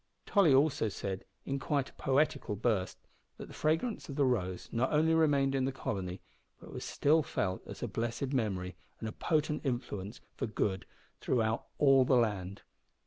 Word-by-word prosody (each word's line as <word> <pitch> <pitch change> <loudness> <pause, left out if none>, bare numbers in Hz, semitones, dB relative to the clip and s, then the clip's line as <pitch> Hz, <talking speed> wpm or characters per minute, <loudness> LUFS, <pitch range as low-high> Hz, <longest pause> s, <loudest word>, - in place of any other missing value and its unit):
Tolly 195 -7 +4
also 135 -4 +3
said, 95 -1 -5 0.2
in 135 0 -2
quite 140 -1 -1
a - - -31
poetical 140 -5 +1
burst, 105 -3 0 0.4
that - - -7
the - - -11
fragrance 160 +10 -1
of 140 - -5
the 140 -1 +3
Rose 95 -8 -1
not 120 +3 0
only 160 +2 +3
remained 145 -4 +3
in 135 -1 +1
the 135 - 0
Colony, 95 -8 -4 0.4
but - - -12
was - - -5
still 155 +3 +3
felt 95 -9 -2
as - - -7
a - - 0
blessed 120 +4 -3
memory 95 -7 -1 0.2
and 110 - -4
a - - -3
potent 150 +3 0
influence 120 -6 -3
for - - -3
good 95 -3 -1 0.3
throughout 115 -2 0
all 135 -2 +6
the 130 - +3
land. 100 -5 0
130 Hz, 175 wpm, -32 LUFS, 105-145 Hz, 0.4 s, all